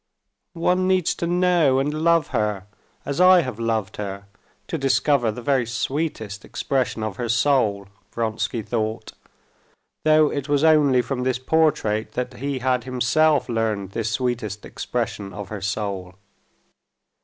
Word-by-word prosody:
"One 180 +2 +2
needs 185 -3 +2
to 170 - -3
know 175 -6 +3
and 140 +2 0
love 165 0 +2
her 105 -5 -1 0.4
as 140 +5 -1
I 185 -1 +7
have 125 -7 -5
loved 110 -3 -2
her 100 -1 -5 0.4
to 165 - -2
discover 135 -3 +2
the 120 +3 -8
very 130 -2 +1
sweetest 120 -5 -3
expression 130 -5 -2
of 110 -3 -4
her 120 -2 -3
soul," 115 -5 +2 0.2
Vronsky 115 0 -2
thought, 110 0 -3 0.9
though 155 -1 +4
it 140 0 -4
was 145 0 +2
only 145 -6 +4
from 125 +1 -3
this 130 0 0
portrait 130 -6 +1
that 125 - -3
he 140 +1 -3
had 125 -1 0
himself 130 +4 +2
learned 110 -5 -1
this 115 +1 -2
sweetest 110 -3 -2
expression 105 -4 -4
of 105 -2 -7
her 105 -2 -6
soul. 100 -2 -3
125 Hz, 145 wpm, -23 LUFS, 110-145 Hz, 0.9 s, I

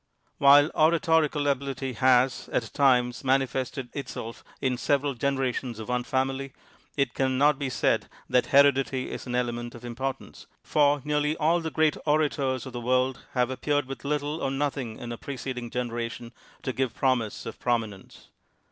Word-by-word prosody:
TViiile 145 +2 +7
oratorical 160 -2 +3
ability 135 -1 -2
has, 130 +1 +3
at 115 - -2
times, 125 -3 +2
mani 135 0 +3
fested 130 0 -4
itself 115 -5 -6 0.2
in 130 -2 0
several 140 +3 0
generations 130 -2 -1
of 110 +1 -8
one 125 0 0
family, 135 +1 -2 0.4
it 140 - +1
can 130 -1 0
not 145 +1 +4
be 140 -2 -2
said 130 - 0 0.2
that 125 - +2
heredity 135 -2 +3
is - - -7
an 125 - -2
element 120 -1 -2
of 120 +1 -10
importance, 130 +3 -5 0.2
for 145 -2 +2
nearly 150 +1 0
all 165 +3 +2
the 160 - -3
great 155 -1 +2
orators 145 -4 +1
of 130 - -8
the 120 - -4
world 130 +2 +1
have 125 0 +1
appeared 145 +2 0
with 135 +1 -8
little 150 +2 -2
or - - 0
nothing 135 -4 -2
in 120 - -7
a 115 - -6
preceding 130 -3 -5
generation 120 -1 -4 0.3
to 130 - -2
give 130 -2 -1
promise 125 -5 0
of 115 - -7
prominence. 110 -5 -3
130 Hz, 165 wpm, -27 LUFS, 125-140 Hz, 0.4 s, TViiile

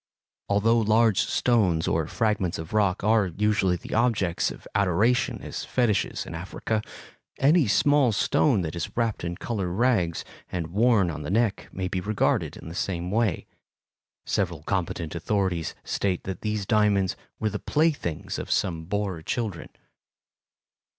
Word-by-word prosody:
Although 110 +4 +3
large 110 -1 +3
stones 95 -10 +2
or 80 -2 0
fragments 100 -4 0
of 80 +3 -7
rock 100 -3 +1
are 110 -1 +3
usually 95 0 +1
the 85 - -8
objects 110 -7 +1
of - - -10
adoration 100 +5 +2
as - - -5
fetiches 120 -5 0
in - - -8
Africa, 95 +5 -3 0.6
any 145 0 +4
small 145 +3 +4
stone 110 +2 +2
that 80 -1 -4
is 85 +5 -5
wrapped 115 -5 0
in 85 0 -3
colored 100 -6 -3
rags 95 -4 +1 0.3
and 85 -2 -4
worn 105 -4 +3
on 75 - -6
the 75 - -5
neck 110 0 0
may 95 -1 -3
be 90 0 -2
regarded 105 +2 0
in - - -11
the 80 - -7
same 90 -1 -3
way. 110 -4 0 0.8
Several 85 -6 -1
competent 85 -3 -2
authorities 90 -2 -1
state 95 -3 -1
that 95 - -5
these 105 -2 -2
diamonds 100 -3 +2 0.2
were 110 -1 0
the - - -3
playthings 100 - -1
of - - -6
some 85 -5 0
Boer 95 -2 -2
children. 100 -1 -3
100 Hz, 150 wpm, -26 LUFS, 90-110 Hz, 0.8 s, any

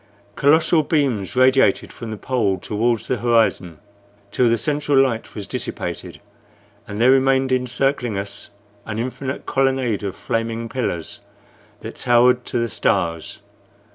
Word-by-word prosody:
Colossal 160 +3 +4
beams 135 - -1
radiated 130 +1 +3
from 115 - -8
the 110 - -5
pole 110 -6 0
toward 115 +3 -1
the 125 - -2
horizon 115 -7 +1 0.5
till 125 +2 +2
the 115 - +2
central 145 +3 0
light 125 -4 0
was 105 - -5
dissipated, - - -5 0.7
and 105 - -6
there 120 +4 +5
remained 135 0 +3
encircling 125 -2 0
us 100 0 -6 0.4
an 110 0 -4
infinite 130 +3 -4
colonnade 135 -5 0
of 100 -2 -4
flaming 115 0 -3
pillars 115 -10 -4 0.6
that - - -8
towered 125 0 +3
to - - -3
the 115 0 0
stars. 85 -6 -1
120 Hz, 135 wpm, -21 LUFS, 110-135 Hz, 0.7 s, there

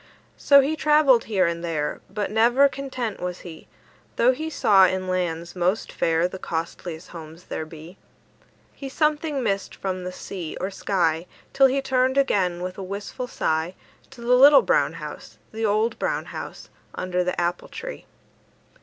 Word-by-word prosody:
So 280 -1 +7
he 290 +4 -1
travelled 300 -6 +4
here 195 -4 +2
and 170 0 -2
there, 155 -3 -2
But 205 0 -3
never 240 +6 +5
content 260 -6 -5
was 180 0 -5
he, 165 -3 -11 0.5
Though 245 +2 +4
he 310 +5 -4
saw 195 -10 +5
in 185 +1 -2
lands 170 -2 -2
most 185 +4 0
fair 165 +1 +1
The 185 +1 -9
costliest 165 0 -5
homes 165 0 -11
there 160 - -5
be. 160 +4 -12 0.8
He 275 - -8
something 300 -1 0
missed 195 -3 -2
from 185 -1 -4
the 180 - -4
sea 180 -3 -7
or 190 +2 -3
sky, 175 -4 0 0.3
Till 270 0 +6
he 270 +1 -1
turned 260 0 +1
again 185 -10 +1
with 185 +1 -5
a - - -4
wistful 200 +6 -6
sigh 160 -3 -1 0.3
To 270 -3 -14
the 240 +1 +2
little 275 +3 +8
brown - - +2
house, - - -9
The 220 0 -1
old 215 +3 0
brown - - -1
house, - - -8 0.3
Under 180 0 -1
the 180 0 -2
apple 175 0 -1
tree. - - -8
195 Hz, 165 wpm, -24 LUFS, 175-260 Hz, 0.8 s, little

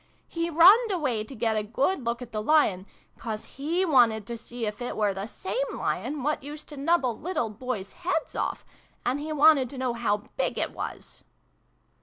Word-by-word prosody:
" - - -40
He 335 0 0
runned 380 +9 +7
away 270 - 0
to 265 +5 -10
get 225 0 0
a 215 - +1
good 265 - 0
look 235 +1 -2
at 245 - -12
the 215 - -2
Lion; 210 -8 +3 0.3
'cause 220 -2 -4
he 330 +7 -1
wanted 235 - +4
to 235 - -5
see 235 +1 -6
if 210 +2 -4
it 245 - -4
were 210 -2 +2
the 195 +2 -5
same 385 - -3 0.2
Lion 290 -2 -2
what 300 +2 0
used 295 +2 -9
to 295 - -8
nubble 275 -5 +1
little 300 - -2
Boys' 215 -3 -5
heads 345 -2 -2
off; - - -2 0.4
and 260 +3 0
he 305 +2 -5
wanted 300 -4 +5
to 275 - -9
know 255 -2 -1
how 230 -3 +1 0.2
big - - 0
it - - -1
was - - -7
255 Hz, 200 wpm, -27 LUFS, 220-310 Hz, 0.4 s, runned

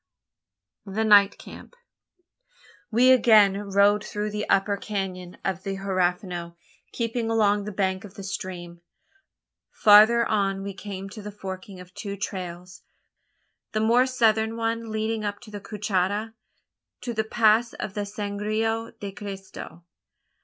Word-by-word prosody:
THE 205 +3 -1
NIGHT 205 -2 +6
CAMP. - - -12 1.1
We 245 +3 +5
again 220 -6 +6
rode 200 +1 +3
through 210 0 -4
the 210 0 -4
upper 195 +1 +2
canon 190 -3 -5
of 190 -3 -1
the 195 0 -4
Huerfano, 180 -2 -2 0.4
keeping 230 -1 -2
along 210 -2 +2
the 210 - -4
bank 190 -1 -1
of 205 -1 -12
the 195 - -8
stream. 180 -3 -6 0.9
Farther 220 +3 +6
on 195 -2 0
we 200 0 -5
came 195 0 -7
to 210 +2 -9
the 210 0 -7
forking 190 -1 -8
of 180 0 -13
two 200 0 -6
trails 180 -2 -6 0.9
the 215 - 0
more 235 +4 +4
southern 225 -3 +2
one 230 0 -2
leading 220 0 -2
up 205 -1 -3
to 215 - -13
the 205 -1 -7
Cuchada, 210 +1 -2 0.7
to 240 - -4
the 220 -1 0
pass 225 +1 +3
of - - -5 0.2
Sangre 215 +2 -2
de 200 -1 -5
Cristo. 195 -3 -9
205 Hz, 135 wpm, -25 LUFS, 195-220 Hz, 1.1 s, NIGHT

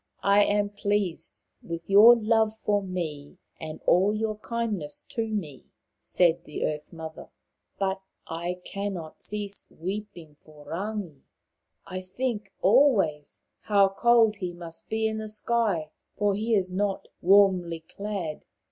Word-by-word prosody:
" - - -48 0.2
I 205 - +7
am 205 0 +1
pleased 205 -3 -2 0.2
with 170 0 -6
your 210 +5 +9
love 220 -1 +2
for 205 -1 +1
me, 165 -7 -5 0.2
and 155 -1 -6
all 195 +4 +4
your 215 -1 -2
kindness 215 -11 -3
to 230 -1 -2
me," 175 -11 -4 0.3
said 170 -1 +2
the 150 - -3
Earth 150 -1 -4
mother, 160 -1 -9 0.3
" - - -52
but 190 0 0 0.2
I 175 +2 -4
cannot 195 -5 -5
cease 205 -1 -6
weeping 175 -4 -7
for 150 -1 -16
Rangi. 190 -5 -4 0.6
I 185 0 -5
think 210 +1 -3
always 200 - +3 0.2
how 200 -2 +4
cold 225 +1 +4
he 180 -3 -4
must 170 -1 -10
be 220 0 0
in 220 0 -1
the 215 0 -5
sky, 210 -7 0 0.3
for 205 -1 +2
he 220 +3 +1
is 185 -2 0
not 195 0 -1
warmly 185 -3 +4
clad." 190 -3 -5
195 Hz, 140 wpm, -27 LUFS, 170-215 Hz, 0.6 s, your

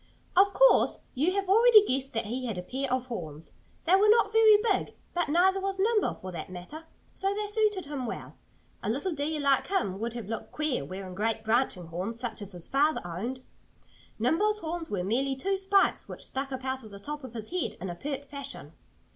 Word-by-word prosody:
Of 390 +2 +6
course - - +5
you 305 +8 +1
have 395 -1 -1
already 435 +1 +7
guessed 270 -2 0
that 225 -1 0
he 250 +4 -3
had 220 -5 -3
a 180 - -4
pair 265 +6 -3
of 255 0 0
horns. 165 - -7 0.3
They 340 - +3
were 415 +2 +5
not 430 -1 +4
very 440 -1 +7
big. 420 -2 0 0.2
But 350 -3 0
neither 375 +5 +3
was 390 0 -1
Nimble, 425 +2 +2
for 185 - -8
that 170 0 -6
matter. 185 - -9 0.3
So 390 +1 -1
they 420 0 -1
suited 415 -3 +1
him 280 -4 -4
well. - - -6 0.5
A - - -3
little 280 - -1
deer 305 +1 -1
like 280 -2 +2
him 200 - -1
would 230 +1 -3
have 235 -4 -6
looked 225 +1 -5
queer 305 - 0
wearing 185 +5 -7
great 220 +3 -1
branching 220 -5 +1
horns 185 +8 -4
such 240 -3 -5
as 200 -1 -7
his 175 -2 -8
father 295 +3 +2
owned. 230 +10 -5 0.7
Nimble's 350 - +2
horns 330 0 -4
were 195 -3 -2
merely 265 +7 0
two 390 +9 -1
spikes 390 +1 +2
which - - -8
stuck 270 +1 -4
up 260 0 -5
out 260 -1 -2
of 215 - -11
the 200 -1 -10
top 295 +6 -6
of 245 -2 -9
his 220 +3 -5
head 365 -1 -1
in 185 - -5
a 175 - -4
pert 280 +7 -5
fashion. 280 0 -8
275 Hz, 215 wpm, -28 LUFS, -, 0.7 s, already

